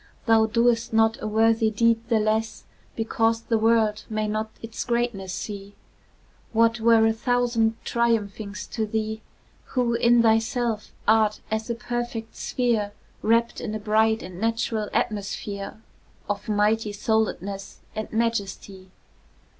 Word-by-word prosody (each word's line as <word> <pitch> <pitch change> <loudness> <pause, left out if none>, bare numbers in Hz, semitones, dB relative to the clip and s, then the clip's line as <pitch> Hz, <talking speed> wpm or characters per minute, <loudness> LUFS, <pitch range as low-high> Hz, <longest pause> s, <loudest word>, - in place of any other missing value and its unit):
Thou 225 -2 +5
doest 230 0 +2
not 225 0 +3
a - - -3
worthy 225 +1 +3
deed 230 +1 +2
the 225 -2 +3
less 220 +1 -1 0.3
Because 225 0 +1
the 230 -1 0
world 220 -1 +2
may 215 -1 -1
not 215 +1 -2
its 225 0 -5
greatness 235 -6 -1
see; 200 +1 -6 0.8
What 230 +1 +3
were 225 0 +5
a 225 - +3
thousand 235 -1 +1
triumphings 215 -3 -1
to 220 -2 -1
thee, 220 0 -2 0.5
Who, 245 -2 +2
in 235 0 +4
thyself, 225 0 +1 0.2
art 215 -1 +3
as 220 +1 -2
a 235 - 0
perfect 240 -1 -4
sphere 225 -5 0 0.3
Wrapt 230 +2 +2
in 215 -2 -4
a - - -3
bright 220 +1 +2
and 180 +1 -9
natural 225 -1 -1
atmosphere 200 0 -3 0.5
Of 205 +2 -3
mighty 210 +1 +1
souledness 200 -2 -2
and 215 - -5
majesty? 200 -4 -2
220 Hz, 130 wpm, -25 LUFS, 215-230 Hz, 0.8 s, Thou